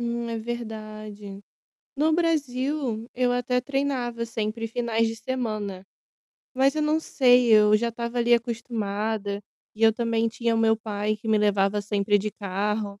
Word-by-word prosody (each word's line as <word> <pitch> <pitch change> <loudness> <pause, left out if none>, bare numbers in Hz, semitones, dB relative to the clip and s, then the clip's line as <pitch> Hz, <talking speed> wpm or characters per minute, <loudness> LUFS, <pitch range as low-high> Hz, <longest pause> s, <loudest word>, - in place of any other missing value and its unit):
Hum, 235 0 -2
é 230 - -2
verdade. 215 -3 -7 0.6
No 310 +2 +3
Brasil, 275 -7 -1
eu 250 0 +2
até 245 0 0
treinava 255 -3 -2
sempre 225 0 -3
finais 230 -1 0
de 225 - -4
semana. 215 -5 -4 0.7
Mas 265 +1 +3
eu 305 - +1
não 305 +1 +2
sei, 250 -5 +4
eu 210 -1 +6
já 235 +2 0
estava 235 +1 -4
ali 240 0 +4
acostumada, 220 -3 -2 0.3
e 215 - -7
eu 225 - +8
também 230 0 0
tinha 230 0 -1
o - - +1
meu 225 0 +4
pai 210 -1 -2
que 210 - -12
me 220 -1 +3
levava 205 0 +2
sempre 205 0 +1
de 210 +2 -3
carro, 205 +1 -3
225 Hz, 155 wpm, -25 LUFS, 210-245 Hz, 0.7 s, eu